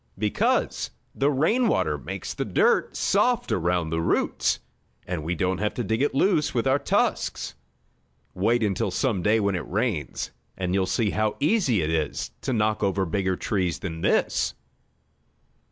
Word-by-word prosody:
"Because 105 +1 0 0.2
the 140 +2 +2
rain 165 - +2
water - - +1
makes - - -5
the - - -2
dirt 470 0 +2
soft 245 -2 +2
around 85 -2 0
the 80 0 0
roots, 80 - +1 0.5
and 90 -4 -3
we 85 +3 -1
don't 90 +1 0
have 105 +1 -1
to 120 - -2
dig 110 +3 -1
it 145 - +1
loose 155 -3 +2
with 120 - +1
our 135 +1 +3
tusks. - - 0 0.8
Wait 115 +5 +2
until 100 -1 0
some 100 +1 0
day 105 +4 +3
when 100 -1 +1
it 90 - -3
rains, 100 - -2 0.3
and 90 -1 -1
you'll 95 -1 +1
see 105 +2 +1
how 110 -1 0
easy 145 - +2
it 75 - -1
is 80 -3 -1
to 135 - -2
knock 110 -2 +1
over 95 -1 +1
bigger 95 +2 0
trees 90 -3 -1
than 80 -4 -6
this." - - +1
105 Hz, 165 wpm, -25 LUFS, 90-125 Hz, 0.8 s, our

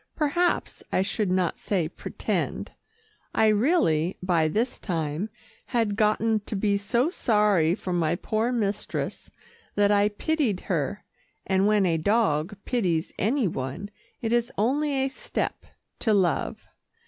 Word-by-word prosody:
Perhaps 340 +3 0
I 185 - +2
should 200 0 -1
not 185 -2 0
say 180 -6 0
pretend. - - -3 0.6
I 220 - +4
really, 205 - +2
by 170 -4 +2
this 225 +10 -1
time, 165 +1 -2 0.4
had 225 -5 0
gotten 220 0 +2
to - - -3
be 200 0 +1
so 235 - +1
sorry 210 - +3
for 185 - -4
my 170 -1 +1
poor 220 +6 -1
mistress, 210 -4 -2 0.5
that 205 0 +3
I 205 0 +4
pitied 235 - 0
her 180 +3 -2 0.4
and 190 +1 +2
when 210 -2 +3
a 165 -2 +1
dog 195 -2 +1
pities 180 -9 0
any 235 +3 +2
one, 140 +7 -4 0.3
it 225 0 0
is 240 0 +1
only 280 +8 +1
a 270 0 +1
step 265 - -4 0.3
to 220 -3 +2
love. 185 -3 0
205 Hz, 135 wpm, -26 LUFS, 180-230 Hz, 0.6 s, I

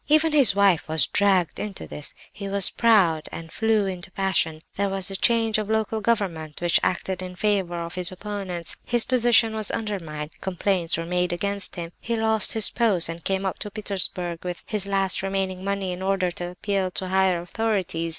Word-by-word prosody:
Even 310 +1 +4
his 280 -9 +6
wife 195 -6 +3
was 160 -3 +3
dragged 190 -4 +2
into 205 -2 -5
these. 150 - -7 0.2
He 200 -1 -6
was 200 -1 +3
proud, 190 -9 +3
and 165 -1 -8
flew 220 -2 +2
into 185 -1 -4
a - - -36
passion; 165 -5 0
there 200 0 0
was 195 0 -1
a - - -4
change 225 +1 +3
of 210 -1 -4
local 220 0 0
government 180 -9 -1
which 175 -1 +3
acted 185 0 -1
in 180 0 -7
favour 190 -3 0
of 170 0 -5
his 180 0 0
opponents; 185 -3 -3
his 240 -2 0
position 240 -3 +4
was 215 -2 -1
undermined, 165 -9 -4
complaints 185 -2 0
were 165 - -3
made 180 +1 0
against 200 +2 0
him; 170 -1 -6
he 235 - -2
lost 220 -2 +2
his 220 -2 +2
post 205 -9 +2
and 165 0 -7
came 195 +1 -1
up 190 - -2
to 210 - -4
Petersburg 185 -5 -3
with 175 -3 -5
his 205 -3 -2
last 195 -1 0
remaining 190 -1 -2
money, 195 -1 -2
in 180 +1 -6
order 190 -2 0
to 175 0 -5
appeal 190 +1 -2
to 185 0 -4
higher 190 -2 +2
authorities. 185 -3 -2
190 Hz, 195 wpm, -24 LUFS, 175-210 Hz, 0.2 s, his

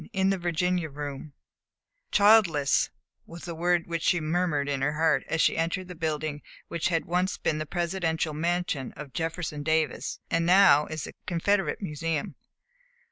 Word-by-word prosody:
IN 190 0 +2
THE 195 - -1
VIRGINIA 175 0 0
ROOM 145 0 -7 0.8
"Childless," 200 -9 +4 0.4
was 170 0 -10
the 170 - -5
word 175 +1 +1
which 165 -1 -3
she 175 - +2
murmured 155 -2 0
in 140 -2 -1
her 145 +2 +1
heart, 160 +2 +2
as 165 - 0
she - - +3
entered 170 +3 -1
the - - -6
building 155 -3 -3 0.3
which 170 -1 -1
had 165 -2 0
once 180 +3 0
been 155 - -1
the 155 - -4
Presidential 170 -3 -1
Mansion 165 -3 -1
of 140 -3 -10
Jefferson 165 -1 -3
Davis 160 0 -1
and 165 0 +2
now 180 -4 +6
is 155 -1 -5
the - - -7
Confederate 195 +3 0
Museum. 160 -2 -3
165 Hz, 160 wpm, -27 LUFS, 150-180 Hz, 0.8 s, now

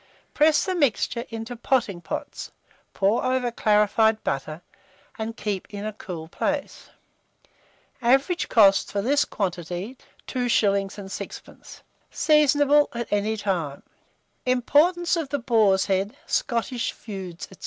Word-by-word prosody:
Press 305 -1 +4
the 375 - -1
mixture 255 - 0
into 225 +2 -6
potting 230 -7 0
pots, - - -6 0.4
pour 200 +4 +1
over 255 -1 0
clarified 215 0 +2
butter, 155 +5 -3 0.6
and 225 +1 -4
keep 200 -3 -3
it 205 - -7
in 200 - -5
a 215 - -4
cool 175 -6 -7
place. 290 - -3 1.1
Average 270 +8 +2
cost 195 -3 +5
for 200 -1 -1
this 285 +5 +2
quantity, 180 +4 -4 0.3
2s. 210 -6 +1
6d. 195 0 -9 0.3
Seasonable 295 -1 +4
at 235 -2 -4
any 210 +2 0
time. 175 -9 -2 0.6
IMPORTANCE 320 +8 +3
OF 315 -5 -3
THE 285 - -1
BOAR'S 220 -6 +3
HEAD, 195 +2 -1
SCOTTISH 235 +1 -1
FEUDS, 190 -5 -8
&c. 190 - -15
220 Hz, 120 wpm, -24 LUFS, 195-260 Hz, 1.1 s, cost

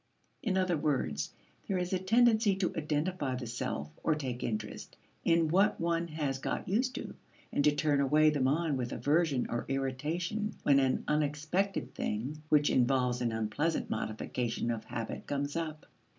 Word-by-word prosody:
In 205 -8 0
other 185 -3 +2
words, 100 - 0 0.4
there 195 - 0
is 180 +1 -2
a 185 - +2
tendency 220 +1 +4
to 190 -2 -1
identify 150 -2 -1
the 125 -1 -5
self 75 -9 -3
or 160 - +3
take 130 -5 -4
interest 110 -2 -4 0.3
in 165 -1 +4
what 195 +6 +3
one 170 0 0
has 150 -4 -2
got - - -3
used 250 +7 +1
to, - - -5 0.4
and 145 - +2
to 150 - +6
turn 145 -2 +2
away 155 +3 +5
the 150 - -1
mind 145 +2 +1
with 120 -1 -3
aversion 150 -3 +2
or 120 - -2
irritation 155 +10 -2
when 140 -1 +5
an 130 -1 +1
unexpected 155 +6 0
thing 130 +9 -3
which 150 -1 +4
involves 125 -1 +2
an 120 -2 +1
unpleasant 110 +9 -1
modification 115 +2 -2
of 110 -1 -4
habit 115 -2 -5
comes 145 +1 -2
up. 155 -2 -3
150 Hz, 165 wpm, -32 LUFS, 130-170 Hz, 0.4 s, to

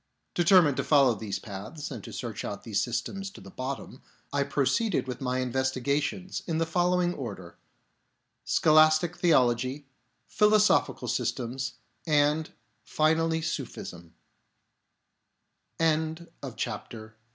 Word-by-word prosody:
Determined 175 -5 +5
to - - 0
follow 140 -5 +5
these 105 -2 -4
paths 110 +10 -7
and 120 -7 -7
to - - -9
search 115 -4 -5
out 100 - -5
these 105 -4 0
systems 195 - -3
to - - -13
the 95 0 -12
bottom, 130 0 -6 0.3
I 140 - +2
proceeded 140 - +1
with 125 0 -5
my 130 0 -1
investigations 130 +8 -1
in 165 -2 -1
the 165 - +1
following 175 +1 +1
order: 100 - -8 0.8
Scholastic 155 +2 +4
theology; 130 -4 +2 0.4
philosophical 210 0 +3
systems; 130 +2 -2 0.2
} - - -45
and, 150 +1 +2 0.3
finally 160 +3 +1
140 Hz, 105 wpm, -28 LUFS, 125-165 Hz, 0.8 s, Determined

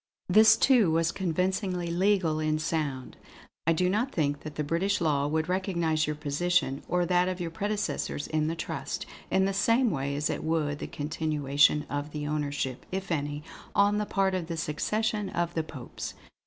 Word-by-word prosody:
This 215 +4 +7
too 245 -9 +5
was 165 +1 +2
convincingly 180 0 -1
legal 180 -3 +2
in 155 0 +1
sound. 150 -5 -3 0.5
"I 165 - +5
do 180 +3 +1
not 220 +8 0
think 145 -3 0
that 150 -1 -5
British 190 +7 +1
law 145 -4 +1
would 160 +1 0
recognise 170 -4 0
your 150 - -1
position, 150 -1 0
or 180 0 +1
that 180 0 +3
of 185 0 -2
your 170 -2 -3
predecessors 205 -5 -2
in 155 -1 0
the 165 - -1
trust, - - -4 0.2
in 190 0 +3
the 195 - 0
same 230 +5 +3
way 140 -2 -2
as 145 +1 0
it - - -3
would 155 -2 0
the - - -4
continuation 150 -1 +1
of 145 +1 -4
the 150 -1 -3
ownership, 145 -3 -2
if 190 0 -4
any, 145 -1 -2 0.3
on 205 +1 +4
the 210 - -2
part 195 -1 +1
of 180 -3 -2
the 165 -1 -4
succession 210 +7 -1
of 170 0 -1
the 165 - 0
Popes. 135 -5 -7
165 Hz, 180 wpm, -28 LUFS, 150-190 Hz, 0.5 s, This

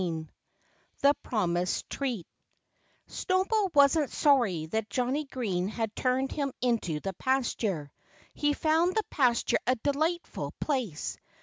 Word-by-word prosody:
V 165 -3 -3 0.8
THE 285 +1 +7
PROMISED 180 -5 -1
TREAT 245 - -3 0.8
Snowball 385 +2 +1
wasn't 285 +1 +5
sorry 235 - +3
that 215 +6 -2
Johnnie 255 +7 0
Green 200 -9 -2
had 220 0 -3
turned 260 +1 0
him 280 -2 -1
into 230 -11 0
the 195 - -3
pasture. 210 - -1 0.4
He 295 0 +1
found 325 +4 +2
the 435 - +2
pasture 245 -4 +2
a 255 - +4
delightful 310 +7 -1
place. 250 - -2
255 Hz, 120 wpm, -29 LUFS, 195-290 Hz, 0.8 s, THE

